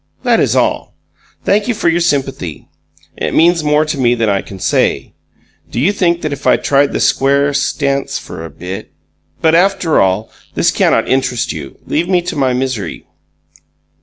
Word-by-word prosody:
That - - +3
is - - +1
all. - - 0 0.5
Thank 205 +3 +2
you 240 - 0
for 205 -4 -1
your 170 +1 +3
sympathy. 135 - -2 0.5
It - - -2
means 170 0 +4
more 150 +1 +2
to 150 -2 -3
me 120 -1 +3
than 115 -2 0
I 100 -1 +1
can 95 - -11
say. - - 0 0.6
Do - - -3
you 155 +10 +3
think 175 -3 0
that 155 -2 -1
if 140 0 -5
I - - +5
tried 140 0 +2
the - - -2
square 140 +1 +2
stance 140 -1 -1
for 80 - -8
a 80 - -7
bit.... 90 +7 -8 0.5
But, 160 0 +4
after 180 -1 +3
all, 95 +3 0 0.2
this - - +2
cannot - - +2
interest 130 -2 0
you. 70 -4 -8
Leave 170 +4 -1
me 180 -2 +2
to 180 - -4
my 135 -3 +1
misery. 125 -4 -3
140 Hz, 180 wpm, -15 LUFS, 120-165 Hz, 0.6 s, I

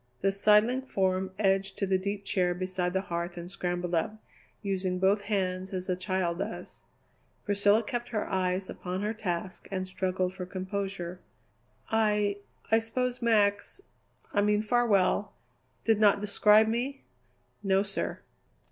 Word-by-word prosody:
The 195 - +3
sidling 210 +5 +4
form 190 -6 0
edged 195 -1 +1
to 200 - 0
the 190 -1 +1
deep 200 +1 -4
chair 180 -3 +1
beside 185 -1 -2
the 190 - +1
hearth 175 -1 -4
and 175 +1 -7
scrambled 180 -2 -3
up, 170 +6 0 0.5
using 190 -2 -1
both 195 +3 +3
hands 190 -2 -2
as 185 -1 -3
a 180 - +2
child 185 -2 -1
does. - - -6 0.6
Priscilla 205 +2 +3
kept 240 +2 -4
her 215 -3 -1
eyes 185 0 0
upon 185 +2 -4
her 210 +1 -1
task 185 -3 -4
and 185 -1 -2
struggled 185 -1 -1
for 185 -1 -6
composure. 185 -2 -4 0.7
"I 210 -2 +2 0.3
I 225 - +6
suppose 250 +3 -2
Max 205 - +2 0.5
I 205 - +3
mean 210 +1 +2
Farwell 210 -4 +2 0.5
did 220 -2 +3
not 205 -2 +5
describe 210 +1 +5
me?" 250 +5 -2 0.6
"No, 195 -1 +2
sir." 195 -1 -3
195 Hz, 145 wpm, -29 LUFS, 185-210 Hz, 0.7 s, I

